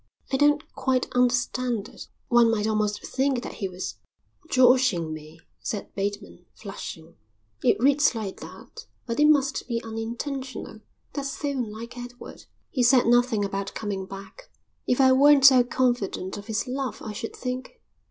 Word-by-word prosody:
"I - - +4
don't 295 +1 +3
quite 260 -2 0
understand 245 -2 +1
it." - - -11 0.2
"One 240 -1 +5
might 215 -2 0
almost 215 -1 -1
think 265 -2 0
that - - -6
he 195 - 0
was 180 -12 -6 0.5
joshing 250 -10 +4
me," 155 +1 -11 0.2
said 205 - -5
Bateman, 200 -3 -5
flushing. 170 -5 -9 0.5
"It - - +4
reads 280 +1 +4
like 210 -4 -5
that, - - -11 0.2
but 230 +1 -3
it 300 - +6
must 280 -4 +2
be 235 -2 -1
unintentional. 235 +2 -5 0.3
That's 280 -1 -3
so 290 - -1
unlike 235 -2 -5
Edward." 245 0 -10 0.3
"He 255 - 0
says 245 +1 +5
nothing 240 -3 +3
about 195 0 -4
coming 195 -3 -4
back." 195 - -11 0.4
"If 250 - +1
I 260 -1 +6
weren't 280 +1 +6
so 260 -3 +8
confident 240 -7 -1
of 205 0 -9
his 220 0 -1
love 265 0 -4
I 215 - -5
should 225 +2 -6
think.... 255 - -5
240 Hz, 155 wpm, -25 LUFS, 205-260 Hz, 0.5 s, so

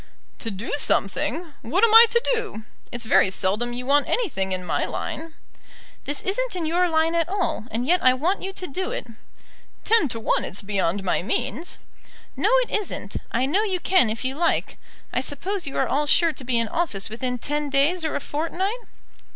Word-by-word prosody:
"To 225 - -3
do 205 +3 -5
something! 305 - -1
What 355 - 0
am 455 -2 +5
I 460 +1 +10
to 470 +1 +2
do? 440 - -4 0.3
It's 240 -1 -4
very 210 - +4
seldom 205 +6 0
you 245 +1 -4
want 285 +2 +3
anything 230 - 0
in 185 -1 -3
my - - 0
line." 320 0 -5 0.7
"This 290 0 -1
isn't 470 +4 -1
in 345 -3 -2
your 350 +3 +2
line 320 0 +2
at 335 0 +1
all, 375 - -1
and 230 +3 -2
yet 355 +5 +2
I 255 0 +6
want 345 +9 0
you 385 - -4
to 375 -1 -5
do 370 +5 -3
it." - - -4 0.8
"Ten 445 -10 +4
to 230 - -3
one 225 - +1
it's 195 - -4
beyond 195 -1 -1
my 190 - +1
means." 255 - -2 0.6
"No, - - +1
it - - -10
isn't. 380 - -3
I 245 +3 +1
know 340 +10 +2
you 385 -4 -1
can 355 -9 +4
if 225 +3 -4
you 260 - -1
like. 335 +4 0 0.3
I - - +1
suppose 350 +7 -1
you 275 - -5
are - - +2
all 295 +2 0
sure 330 +2 +4
to 270 - -8
be 245 -1 0
in 230 -1 +1
office 215 - -2
within 250 +3 -3
ten 295 +3 -2
days 290 +6 +2
or 315 - -2
a - - 0
fortnight?" 345 - -2
295 Hz, 200 wpm, -23 LUFS, 235-360 Hz, 0.8 s, I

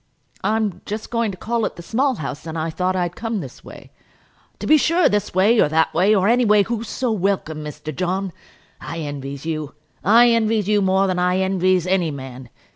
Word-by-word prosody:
"I'm 215 -3 0
just 215 +1 -5
going 230 -2 0
to 190 - -7
call 230 +4 -2
at - - -2
the 170 - -10
Small 260 +8 0
House, 150 -2 -6
and 160 0 -5
I 160 +1 -2
thought 185 +3 -1
I'd 175 -1 -1
come 225 -2 -3
this 135 -8 -9
way." - - -13 0.7
"To - - -6
be 310 - +6
sure; 335 +3 +3
this 205 -3 -1
way, 210 +5 +4
or - - +4
that 160 +1 +1
way, 190 +6 +3
or 190 -1 +2
any 245 +2 +4
way, 210 -2 +4
who's 230 +1 -4
so 255 -3 -1
welcome, 190 -6 -1
Mr. 150 0 -7
John? 185 +2 -2 0.5
I 165 - -7
envies 140 -1 -6
you; 155 -3 -4 0.3
I 235 +4 +6
envies 220 -3 +1
you 210 -1 +3
more 190 0 +2
than 185 -2 -1
I 180 +1 +2
envies 185 -1 +1
any 180 -3 +1
man. 130 -3 -8
190 Hz, 205 wpm, -21 LUFS, 160-220 Hz, 0.7 s, be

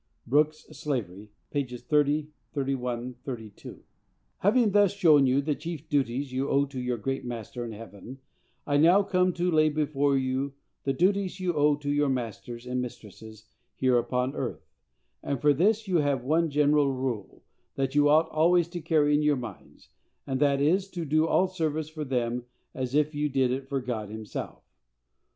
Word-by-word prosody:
(Brooke's 150 +4 +2
Slavery, 105 -8 -4 0.2
pp. 130 -4 -2
30, 150 +3 +1 0.2
31, 125 -3 -2
32.) 110 -6 -8 0.6
Having 220 +2 +3
thus 205 -2 +4
shown 155 -8 +5
you 130 +2 +3
the 150 +1 0
chief 160 0 -7
duties 135 -1 -1
you 135 +2 -1
owe 140 +1 +3
to 135 -2 -6
your 125 -1 -1
great 135 +5 -3
Master 120 0 -6
in 115 - -6
heaven, 110 +3 -10 0.5
I 145 -1 +1
now 175 +7 +6
come 185 -1 +2
to 175 +1 0
lay 155 -1 +4
before 145 -2 +1
you 130 +1 -1 0.3
the 135 - +2
duties 190 +4 +1
you 180 -1 0
owe 150 -1 +3
to 145 0 -4
your 145 -1 +2
masters 120 -1 -4
and 125 0 -2
mistresses 110 -3 -10 0.3
here 130 -2 +3
upon 125 +2 -1
earth; - - -4 0.6
and 140 - -2
for 150 0 +4
this 210 +8 +2
you 180 -2 +2
have 140 -5 +1
one 160 +5 +2
general 145 -1 +3
rule 130 -6 -4 0.3
that 135 -1 -1
you 145 0 +4
ought 155 +2 +5
always 170 +2 +3
to 175 0 -6
carry 155 -2 +2
in 145 - +3
your 150 -1 +3
minds, 120 -7 -10 0.4
and 130 -1 -2
that 140 -1 +3
is, 185 +7 +2
to 175 -3 -5
do 155 +2 +2
all 185 - +3
service 160 -4 -2
for 155 -1 -5
them 125 -3 -2 0.3
as 130 0 -3
if 150 +1 +2
you 150 0 -1
did 130 -2 +1
it 135 +1 -3
for 140 -2 0
God 115 -5 -4
himself. 110 0 -7
140 Hz, 175 wpm, -27 LUFS, 125-155 Hz, 0.6 s, now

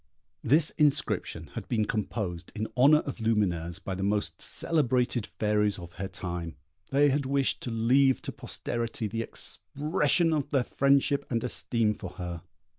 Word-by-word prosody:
This 150 +5 +4
inscription 150 -2 +1
had - - -6
been 110 -3 +1
composed 100 -5 -3
in 110 0 -2
honour 145 +5 +6
of 140 - -6
Lumineuse 90 -7 0
by 95 - -5
the 95 - -4
most 100 +1 -1
celebrated 125 -7 +1
fairies 105 -1 0
of 85 -1 -10
her 95 - -2
time. 85 -4 -5 0.3
They 145 +2 +4
had 140 -1 0
wished 140 0 +1
to - - -4
leave 125 +4 +3
to - - -4
posterity 115 -1 -3
the 115 +2 -3
expression 155 +6 0
of 145 -2 -1
their 135 -4 +2
friendship 140 +2 +2
and 115 -3 -1
esteem 115 -3 0
for 95 -3 -7
her. 90 -2 -6
115 Hz, 155 wpm, -28 LUFS, 100-140 Hz, 0.3 s, honour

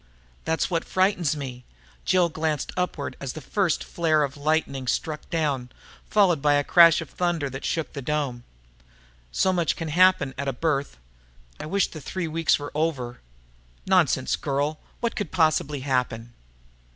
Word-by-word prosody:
"That's 160 +3 0
what 165 -1 0
frightens 185 -5 +1
me." 125 -3 -6 0.4
Jill 185 -2 +4
glanced 155 -2 -2
upward 180 -5 -2
as 135 -2 -4
the - - -7
first 185 +3 0
flare 155 -3 +1
of 140 -1 -3
lightning 145 -3 -1
struck 150 +4 -2
down, 145 -7 -1 0.4
followed 185 -8 +3
by 145 0 +4
a 145 - +2
crash 170 +1 +6
of 160 - -8
thunder 170 -6 -1
that 135 +2 -7
shook 160 -2 -2
the 140 - -5
dome. 135 -4 -2 0.9
"So 185 - +2
much 170 -3 +1
can 165 -1 -5
happen 170 -4 +4
at 140 - -2
a 135 - 0
birth. 140 - -1 0.6
I 150 - -6
wish 195 +4 +2
the 155 - -10
three 175 +5 -4
weeks 160 0 +2
were 145 0 -7
over!" 140 -6 -2 0.6
"Nonsense, - - +3
girl! 145 +2 -1 0.2
What 235 -1 -1
could 205 -6 -3
possibly 155 -4 +1
happen?" 125 -3 -1
155 Hz, 160 wpm, -25 LUFS, 140-170 Hz, 0.9 s, crash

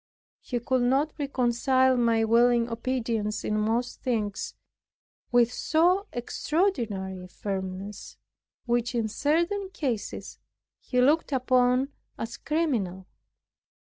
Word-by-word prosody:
He 245 - -3
could 255 +2 0
not 270 +5 +2
reconcile 260 -1 +2
my 230 -2 +3
willing 235 +1 +4
obedience 230 -3 -2
in 210 - -1
most 225 +4 -1
things, 215 -6 -2 0.8
with 240 0 +4
so 360 +6 +2
extraordinary 235 - -1
a - - -9
firmness, 190 +1 -5 0.5
which 240 0 0
in 230 -2 +1
certain 340 - 0
cases 255 - -4 0.4
he 250 - -1
looked 295 +5 +3
upon 255 0 +3 0.3
as 230 +1 -5
criminal. 235 - -1
245 Hz, 105 wpm, -27 LUFS, 225-270 Hz, 0.8 s, willing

